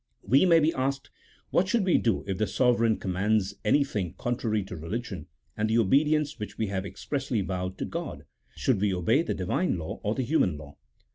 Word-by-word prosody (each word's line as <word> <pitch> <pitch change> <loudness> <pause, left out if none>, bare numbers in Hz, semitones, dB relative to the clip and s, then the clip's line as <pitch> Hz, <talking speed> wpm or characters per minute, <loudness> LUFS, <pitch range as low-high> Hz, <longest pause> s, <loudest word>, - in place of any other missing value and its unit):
We 135 - +4
may 165 -2 +6
be 160 +1 +2
asked, 135 +1 -2 0.4
what 185 - +3
should 215 0 +1
we 180 - +4
do 115 -5 0
if 95 -1 -3
the 110 - +1
sovereign 115 -3 +2
commands 100 +2 0
anything 105 - +1
contrary 115 -4 -1
to 95 -1 -8
religion, 90 0 -5 0.3
and 110 0 0
the 110 - +2
obedience 145 +6 +2
which 105 - -6
we 110 - 0
have 95 0 -2
expressly 125 +4 -2
vowed 90 0 -3
to - - -3
God? - - -6 0.3
should 120 -8 +1
we 100 -2 +2
obey 90 - +2
the 170 - -2
Divine 95 - 0
law 80 -2 -6
or 105 +2 -1
the 130 - -1
human 120 - +1
law? 70 -1 -11
110 Hz, 195 wpm, -27 LUFS, 95-135 Hz, 0.4 s, may